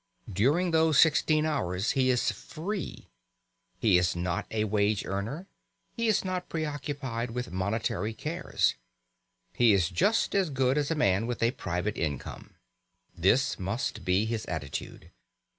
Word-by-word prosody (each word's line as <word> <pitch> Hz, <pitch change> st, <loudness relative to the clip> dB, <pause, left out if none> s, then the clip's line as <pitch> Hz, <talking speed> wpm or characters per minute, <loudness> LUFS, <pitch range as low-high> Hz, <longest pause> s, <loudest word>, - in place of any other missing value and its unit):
During 145 Hz, -, +2 dB
those 160 Hz, -2 st, +3 dB
sixteen 155 Hz, -1 st, +4 dB
hours 100 Hz, -, 0 dB
he 130 Hz, -1 st, +2 dB
is 125 Hz, -2 st, +2 dB
free; 185 Hz, +4 st, -6 dB, 0.7 s
he 100 Hz, -6 st, +4 dB
is 90 Hz, 0 st, +1 dB
not 85 Hz, 0 st, -2 dB
a 110 Hz, -1 st, 0 dB
wage 105 Hz, -1 st, +1 dB
earner; 110 Hz, -, -4 dB, 0.5 s
he 230 Hz, -1 st, 0 dB
is 215 Hz, -3 st, +2 dB
not 180 Hz, -1 st, -3 dB
preoccupied 145 Hz, -6 st, -3 dB
with 125 Hz, -4 st, -4 dB
monetary 105 Hz, +3 st, -2 dB
cares; 165 Hz, +6 st, 0 dB, 0.8 s
he 120 Hz, -3 st, +5 dB
is 90 Hz, -4 st, +2 dB
just 205 Hz, -, +2 dB
as 195 Hz, -4 st, +2 dB
good 130 Hz, -1 st, +1 dB
as 145 Hz, -1 st, 0 dB
a 165 Hz, -, 0 dB
man 100 Hz, -6 st, +2 dB
with 120 Hz, -1 st, -2 dB
a 115 Hz, -, +4 dB
private 90 Hz, -1 st, -3 dB
income. 75 Hz, -4 st, -4 dB, 0.6 s
This 105 Hz, +11 st, +2 dB
must 100 Hz, +1 st, -3 dB
be 95 Hz, +3 st, +2 dB
his 110 Hz, -1 st, -2 dB
attitude. 80 Hz, -4 st, -6 dB
115 Hz, 140 wpm, -28 LUFS, 95-155 Hz, 0.8 s, he